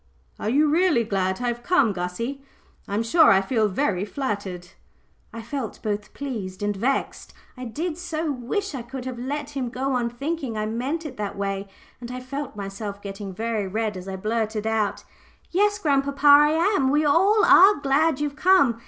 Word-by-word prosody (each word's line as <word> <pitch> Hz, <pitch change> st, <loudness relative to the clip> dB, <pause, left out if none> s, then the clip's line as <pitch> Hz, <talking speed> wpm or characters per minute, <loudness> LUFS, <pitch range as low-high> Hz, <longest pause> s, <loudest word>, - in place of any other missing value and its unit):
"Are 210 Hz, -, -2 dB
you 295 Hz, +6 st, +3 dB
really 320 Hz, -5 st, +3 dB
glad 190 Hz, -1 st, -1 dB
I -, -, 0 dB
have 240 Hz, 0 st, -4 dB
come, 270 Hz, -, +3 dB
Gussie? 190 Hz, +10 st, -4 dB, 0.5 s
I'm 205 Hz, +3 st, -1 dB
sure 320 Hz, +8 st, +5 dB
I 190 Hz, -, +6 dB
feel 215 Hz, +2 st, +1 dB
very 195 Hz, -3 st, 0 dB
flattered." 200 Hz, -7 st, -4 dB, 0.6 s
I 230 Hz, -, -8 dB
felt 245 Hz, -1 st, -5 dB
both 210 Hz, -1 st, -3 dB
pleased 210 Hz, -9 st, -5 dB
and 205 Hz, 0 st, 0 dB
vexed. 250 Hz, +8 st, -2 dB, 0.2 s
I 255 Hz, -1 st, -7 dB
did 315 Hz, +8 st, -4 dB
so 320 Hz, -3 st, -2 dB
wish 285 Hz, -, -3 dB
I 265 Hz, -, -4 dB
could 250 Hz, +2 st, -8 dB
have 255 Hz, -2 st, -5 dB
let 285 Hz, +3 st, -4 dB
him 265 Hz, -4 st, -3 dB
go 265 Hz, +3 st, -2 dB
on 240 Hz, -2 st, 0 dB
thinking 275 Hz, -1 st, -4 dB
I 215 Hz, -, -1 dB
meant 260 Hz, +9 st, -3 dB
it 300 Hz, -, -7 dB
that 205 Hz, -2 st, -4 dB
way, 195 Hz, 0 st, -3 dB, 0.3 s
and 240 Hz, -1 st, -8 dB
I 250 Hz, -, -5 dB
felt 275 Hz, +1 st, -6 dB
myself 200 Hz, 0 st, -6 dB
getting 200 Hz, 0 st, -6 dB
very 220 Hz, +1 st, -2 dB
red 215 Hz, +1 st, -2 dB
as 185 Hz, 0 st, -8 dB
I 190 Hz, -, -4 dB
blurted 220 Hz, +1 st, -2 dB
out 220 Hz, -2 st, 0 dB, 0.5 s
"Yes, 410 Hz, +3 st, +2 dB
grandpapa, 280 Hz, -5 st, 0 dB
I 290 Hz, +1 st, +8 dB, 0.3 s
am 265 Hz, -5 st, +2 dB
we 300 Hz, +2 st, +2 dB
are 285 Hz, -, +4 dB
all 410 Hz, +1 st, +6 dB
glad 285 Hz, +1 st, +2 dB
you've 290 Hz, -1 st, -2 dB
come. 305 Hz, -9 st, +4 dB
245 Hz, 185 wpm, -24 LUFS, 210-290 Hz, 0.6 s, I